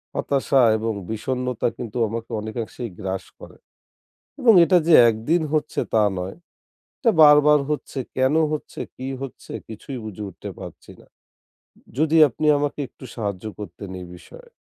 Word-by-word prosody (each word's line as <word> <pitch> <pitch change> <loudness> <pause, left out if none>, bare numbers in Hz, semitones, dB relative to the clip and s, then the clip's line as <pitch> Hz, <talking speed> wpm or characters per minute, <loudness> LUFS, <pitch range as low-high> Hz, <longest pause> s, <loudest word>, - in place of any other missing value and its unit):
হতাশা 135 -1 +1 0.2
এবং 110 0 -2 0.2
বিষন্নতা 125 +2 -2
কিন্তু 120 0 -6
আমাকে 115 +1 -6
অনেকাংশেই 115 +2 -5
গ্রাস 95 0 -4
করে। - - -13 0.8
এবং 235 -3 +6
এটা 180 +1 +4
যে 170 - +6
একদিন 115 +10 0
হচ্ছে 155 - -1
তা 110 -1 +5
নয়, 90 +7 -5 0.6
এটা 235 - +3
বার, 150 -1 +9
বার, 150 -1 +6
হচ্ছে 150 -2 -3 0.2
কেন 130 +3 +2 0.2
হচ্ছে, 155 - -5 0.2
কি 130 - -6
হচ্ছে 135 - -9 0.2
কিছুই 115 +5 -8
বুঝে 105 0 -7
উঠতে 90 - -9
পারছি - - -11
না। - - -19 0.9
যদি 160 +1 +2
আপনি 150 +5 -3
আমাকে 145 0 -2
একটু - - -16
সাহায্য 100 -5 -4
করতেন 100 -1 -8
এই - - -9
বিষয়ে। 485 - -15
125 Hz, 150 wpm, -22 LUFS, 110-150 Hz, 0.9 s, বার